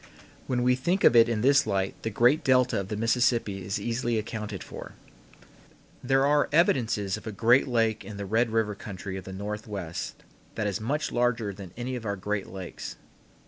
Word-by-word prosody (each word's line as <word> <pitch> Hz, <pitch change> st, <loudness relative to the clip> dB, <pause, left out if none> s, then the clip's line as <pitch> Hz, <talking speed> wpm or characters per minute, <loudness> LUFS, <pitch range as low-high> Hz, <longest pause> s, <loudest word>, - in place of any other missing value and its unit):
When 125 Hz, -1 st, 0 dB
we 125 Hz, 0 st, +4 dB
think 175 Hz, +10 st, 0 dB
of -, -, +6 dB
it 115 Hz, 0 st, +7 dB
in 110 Hz, -2 st, 0 dB
this 140 Hz, +1 st, +4 dB
light 95 Hz, -2 st, 0 dB
the 115 Hz, -, -2 dB
great 120 Hz, +7 st, +3 dB
delta 125 Hz, -4 st, +3 dB
of 95 Hz, -, -4 dB
the 105 Hz, -, -4 dB
Mississippi 115 Hz, -3 st, +1 dB
is 95 Hz, +3 st, -2 dB
easily 120 Hz, 0 st, -1 dB
accounted 105 Hz, -2 st, -4 dB
for. -, -, -9 dB, 1.1 s
There 135 Hz, +1 st, +3 dB
are 145 Hz, +1 st, +3 dB
evidences 115 Hz, -, +2 dB
of 110 Hz, -, -11 dB
a -, -, -3 dB
great 115 Hz, +7 st, +4 dB
lake 115 Hz, -3 st, +1 dB
in 100 Hz, +1 st, -8 dB
the 100 Hz, -, -4 dB
Red 115 Hz, +4 st, +1 dB
River 110 Hz, -1 st, 0 dB
country 95 Hz, -1 st, -7 dB
of 95 Hz, -1 st, -7 dB
the 95 Hz, -, -7 dB
Northwest 100 Hz, -3 st, -5 dB, 0.3 s
that 110 Hz, -, -2 dB
is 100 Hz, 0 st, -2 dB
much 145 Hz, +7 st, -1 dB
larger 120 Hz, -4 st, 0 dB
than 95 Hz, -2 st, -10 dB
any 125 Hz, +1 st, -3 dB
of 120 Hz, -, -6 dB
our 100 Hz, -, -1 dB
greatest 100 Hz, +1 st, -3 dB
lakes. 95 Hz, -2 st, -7 dB
110 Hz, 190 wpm, -27 LUFS, 100-125 Hz, 1.1 s, it